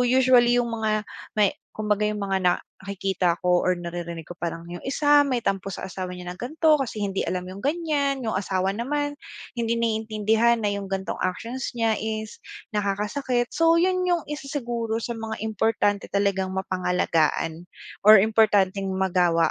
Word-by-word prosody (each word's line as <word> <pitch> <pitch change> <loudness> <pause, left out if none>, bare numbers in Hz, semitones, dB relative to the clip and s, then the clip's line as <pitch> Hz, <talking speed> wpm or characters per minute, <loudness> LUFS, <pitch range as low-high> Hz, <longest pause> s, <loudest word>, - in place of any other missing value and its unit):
usually 245 -1 +5
yung 235 -1 0
mga 215 -1 0 0.3
may 210 -2 +4 0.2
kumbaga 210 -1 0
yung 210 -1 -2
mga 195 -1 0 0.4
nakikita 190 -3 -1
ko 180 0 +4
or 185 - +3
naririnig 170 -1 -6
ko, 175 - -8
parang 165 -1 -4
yung 175 - -6
isa 290 +1 +4
may 250 -4 -1
tampo 195 -1 -2
sa - - -7
asawa 185 -1 -5
niya 180 0 -7
ng 180 - -9
gan'to, 310 +4 +2
kasi 225 -5 -3
hindi 195 -1 -1
alam 180 -1 -2
yung 190 - -8
ganyan, 285 -1 0
yung 220 - -1
asawa 190 -1 0
naman 290 +7 -2 0.4
hindi 230 0 +1
naiintindihan 225 0 +1
na 205 - +1
yung 200 -1 -3
ganitong 190 0 -3
actions 235 +8 -3
niya 225 -2 +1
is 220 0 -4 0.3
nakakasakit. 210 +5 -1
So 330 0 +3
yun 365 +1 +2
yung 350 -3 +1
isa 295 -2 -5
siguro 235 -5 -3
sa 235 -1 -4
mga 220 -1 -5
importante 210 -1 0
talagang 195 -2 0
mapangalagaan, 180 -3 0 0.4
or 215 -2 +9
importanteng 205 -3 +3
magawa 175 -3 +2
215 Hz, 160 wpm, -25 LUFS, 190-240 Hz, 0.4 s, or